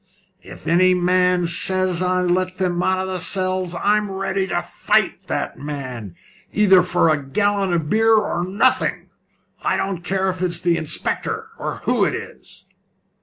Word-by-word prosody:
"If 90 -1 -13
any 185 +2 +4
man 180 0 +2
says 185 +1 0
I 185 0 +1
let 185 +1 0
them 180 -2 -1
men - - +1
out 185 0 +1
of 190 - -3
the 185 -1 -3
cells, 185 -1 -1
I'm 210 +3 +1
ready 190 0 -2
to - - -1
fight - - 0
that - - -3
man, 130 - -6 0.4
either 195 -3 +5
for 175 -2 +2
a 145 - -2
gallon 200 +6 0
of 165 -3 0
beer 225 +5 +4
or 195 -5 0
nothing. 190 +4 0 0.5
I - - 0
don't 190 -3 -3
care 190 +1 -1
if 185 -1 -8
it's 175 -2 -1
the 170 -1 +1
inspector, 445 - -2
or - - -4
who - - +2
it - - +1
is." - - -9
185 Hz, 170 wpm, -21 LUFS, 175-190 Hz, 0.5 s, either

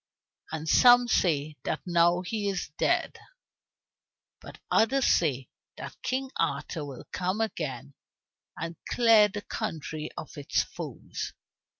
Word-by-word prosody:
And 160 0 -4
some 245 +7 +7
say 155 -8 +1
that - - -2
now 175 0 +3
he 205 +2 -2
is 185 -6 -3
dead, - - +1 1.2
but - - -12
others 265 +4 +3
say 135 -6 +2 0.3
that - - -9
King 260 +1 -2
Arthur 160 - -1
will 140 -3 -8
come 185 +3 -1
again, 140 - -3 0.6
and 165 0 -5
clear 225 -3 +6
the 205 0 -6
country 160 -7 -4
of 150 - -7
its 140 - +1
foes. - - -7
175 Hz, 120 wpm, -28 LUFS, 155-220 Hz, 1.2 s, some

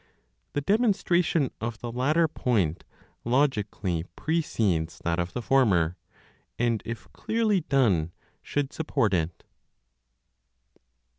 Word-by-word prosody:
The 145 - 0
demonstration 180 - +2
of 115 -1 -3
the 120 0 -6
latter 150 +7 +2
point 105 - 0 0.4
logically 105 - 0
precedes 110 - 0
that 85 0 0
of 85 +1 -2
the 125 - -4
former; 95 -12 +3 0.6
and 115 -2 +1
if 115 0 -6
clearly 220 -3 +1
done, 105 - +2 0.3
should 145 -2 -2
support 115 -9 0
it. 85 -1 -1
120 Hz, 100 wpm, -27 LUFS, 90-150 Hz, 0.6 s, former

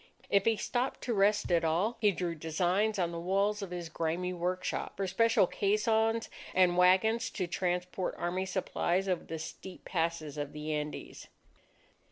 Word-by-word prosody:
If 200 -1 +4
he 225 -1 +3
stopped 250 +4 -2
to 240 - -1
rest 205 -1 +2
at 170 -1 +3
all, 175 +9 +1
he 210 -2 +5
drew 175 -2 -2
designs 180 +7 0
on 175 -2 0
the 170 - -4
walls 200 +4 +1
of 195 - -5
his 175 -1 -5
grimy 165 +3 -2
workshop, 180 +1 -2
for 195 - -1
special 225 +3 +3
caissons 220 +4 +1 0.3
and 180 -1 +5
wagons 190 +6 +4
to 185 - -2
transport 180 +1 -2
army 185 +2 -2
supplies 185 0 0
over 180 -3 0
the 165 - -5
steep 180 +3 -9
passes 165 -4 -2
of 145 -1 -4
the 150 +1 -4
Andes. 150 0 -5
185 Hz, 165 wpm, -31 LUFS, 170-205 Hz, 0.3 s, he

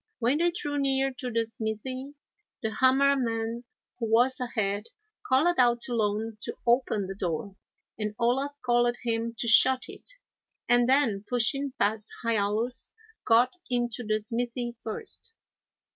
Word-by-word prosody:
When 250 +5 +1
they 345 +1 +3
drew 290 -4 -3
near 270 -1 +1
to 250 - -3
the 230 -1 0
smithy, 245 +5 -5 0.5
the 220 0 -1
Hammer 270 +2 +4
man, 230 -1 -2 0.3
who 230 -2 -2
was 245 +3 +4
ahead, 210 -4 -1 0.4
called 305 +6 +3
out 240 -1 +4
to 245 - -3
Loan 215 0 -1
to - - -5
open 235 -4 +2
the 190 - -5
door, 190 +1 -4 0.4
and 210 0 -3
Olaf 265 +4 0
called 240 0 +3
to 240 - -11
him 230 0 -1
to 235 - -1
shut 255 +3 +6
it, - - -11 0.6
and 245 0 +4
then, 260 -8 +2
pushing 255 +3 +1
past 215 +1 0
Hiallus, 225 +2 -1 0.4
got 240 +2 +4 0.2
into 240 -1 -1
the 215 -1 +1
smithy 240 +2 -3
first. 230 - -6
240 Hz, 145 wpm, -28 LUFS, 220-260 Hz, 0.6 s, shut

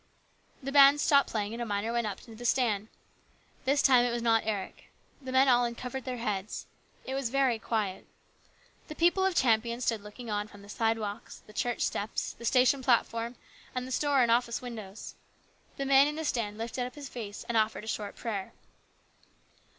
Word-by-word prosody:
The 275 - -3
bands 280 +1 +7
stopped 280 -2 +4
playing, 210 -1 -2
and 235 - -5
a - - -1
miner 205 +2 -1
went 235 -2 0
up 200 -2 -4
into 230 - -13
the 230 +2 -10
stand. 225 -4 +1 0.8
This 280 +2 +3
time 255 -3 +6
it 245 - +1
was 235 0 -2
not 225 -1 +4
Eric. 205 -3 -4 0.4
The 260 -1 -6
men 260 +1 +5
all 245 -1 +5
uncovered 245 +2 -4
their 255 -1 -3
heads. 210 -3 -3 0.4
It 265 - -4
was 270 -3 -1
very 260 -3 +2
quiet. 205 -5 -2 0.8
The 305 - -8
people 350 +4 +3
of 380 -2 +1
Champion 235 -2 +2
stood 225 -3 0
looking 210 +4 -10
on 205 0 -1
from 205 -1 -15
the 200 - -14
sidewalks, 225 0 -2
the 210 - -15
church 240 +2 -1
steps, 210 +2 -2
the 235 - -10
station 255 +3 +4
platform, 235 -1 +1 0.4
and 250 0 -2
the - - -8
store 280 -1 +3
and 235 - +2
office 235 0 +2
windows. 220 -5 -8 0.6
The 275 - -2
man 275 +1 +6
in 300 - -3
the 320 0 -4
stand 215 -7 -1
lifted 235 +2 -3
up 250 - -12
his 290 -2 -7
face 225 -4 -7
and 235 - -2
offered 220 -1 +1
a - - -10
short 210 -2 -4
prayer. 205 -5 -4
235 Hz, 195 wpm, -30 LUFS, 215-260 Hz, 0.8 s, bands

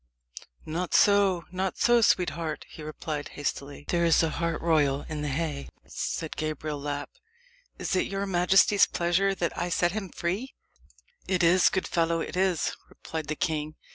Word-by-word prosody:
"Not 170 +3 -2
so 200 -4 +4
not 185 +1 -2
so, 240 0 +4
sweetheart," 170 -6 +1
he - - -12
replied 150 -1 -5
hastily. 145 0 -4
"There 170 -1 +1
is 165 0 +4
a 160 - +1
hart 170 +1 -2
royal 145 -4 +2
in 155 -1 -4
the 150 - -2
haye," 145 0 -3 0.2
said 160 -2 -4
Gabriel 155 -1 -3
Lapp. 145 0 -4 0.7
"Is - - -2
it 185 - +1
your 195 0 -2
majesty's 190 +2 +4
pleasure 185 +3 +1
that 170 -3 -2
I 175 - -2
set 175 0 +2
him 205 -2 -4
free? 195 +12 -3 0.7
"It 185 -2 +1
is, 175 +2 +5
good 190 - -1
fellow 165 -1 +1
it - - -5
is," 185 -3 +1
replied 160 -2 -6
the 155 - -2
king. 155 -1 -2
170 Hz, 165 wpm, -27 LUFS, 155-185 Hz, 0.7 s, is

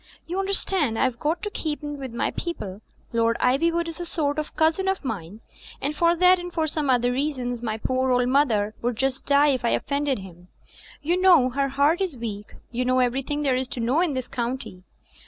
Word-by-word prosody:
You 360 +3 -3
understand 385 - +1
I've 255 -2 0
got 310 +3 -1
to 415 - -3
keep 300 -5 -3
in 295 -1 -5
with 265 -3 -6
my 235 - -1
people. 210 - -5 0.3
Lord 230 0 +2
Ivywood 335 +7 +2
is 330 +1 -7
a 350 - -4
sort 300 -3 -1
of 305 - -5
cousin 325 +4 +2
of 385 -6 -1
mine, 205 -3 -5 0.4
and 290 +2 -2
for 335 +2 +3
that 365 +1 +5
and 355 0 -6 0.2
some 300 -2 -2
other 245 -1 +3
reasons, 250 -3 -2
my 220 -2 -2
poor 255 +3 0
old 250 -1 +3
mother 235 -6 +2
would 245 0 -1
just 265 +3 -2
die 285 +1 +5
if 260 -3 0
I 235 - +2
offended 280 +1 0
him. 180 -3 -12 0.6
You 350 +4 +1
know 335 -9 +6
her 275 +2 0
heart 285 +6 +2
is 355 -9 -2
weak; 210 -3 -6 0.2
you 250 +1 -1
know 255 +1 +2
everything 270 +4 0
there 270 -3 +2
is 255 0 -1
to 250 - -6
know 250 +8 +2
in 330 -6 0
this 255 -1 -3
county. 240 -6 -4
270 Hz, 210 wpm, -24 LUFS, 245-315 Hz, 0.6 s, know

